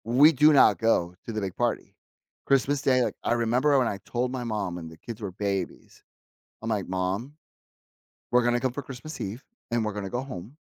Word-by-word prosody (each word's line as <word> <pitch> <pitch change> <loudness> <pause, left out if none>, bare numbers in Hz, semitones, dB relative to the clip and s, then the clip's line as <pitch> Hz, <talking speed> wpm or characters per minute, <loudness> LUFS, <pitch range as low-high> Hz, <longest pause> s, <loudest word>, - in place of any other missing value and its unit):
We 130 +7 +6
do 150 +1 +6
not 145 - +6
go 90 -6 +2
to - - -5
the 110 -1 -2
big 95 -2 -4
party. - - -2 0.5
Christmas 135 +1 +2
Day, 130 -3 +3
like, - - -1
I - - +2
remember 125 +5 +3
when 125 -3 +3
I 100 - -3
told 125 +1 -1
my 130 -1 -3
mom 105 -6 -2
and 80 -1 -8
the 80 - -13
kids 115 +6 -8
were 100 -3 -4
babies. 100 -2 -4 0.6
I'm, 115 - -4
like, 105 -4 -1
"Mom, 95 +9 -2 1.0
we're 125 0 +4
gonna 120 0 +2
come 130 -1 0
for 145 - -5
Christmas 135 +4 -8
Eve, 105 +7 -5 0.3
and 120 -1 +1
we're 105 - -2
gonna 100 -1 -4
go 120 - -1
home, 125 0 -8
120 Hz, 205 wpm, -27 LUFS, 100-130 Hz, 1.0 s, We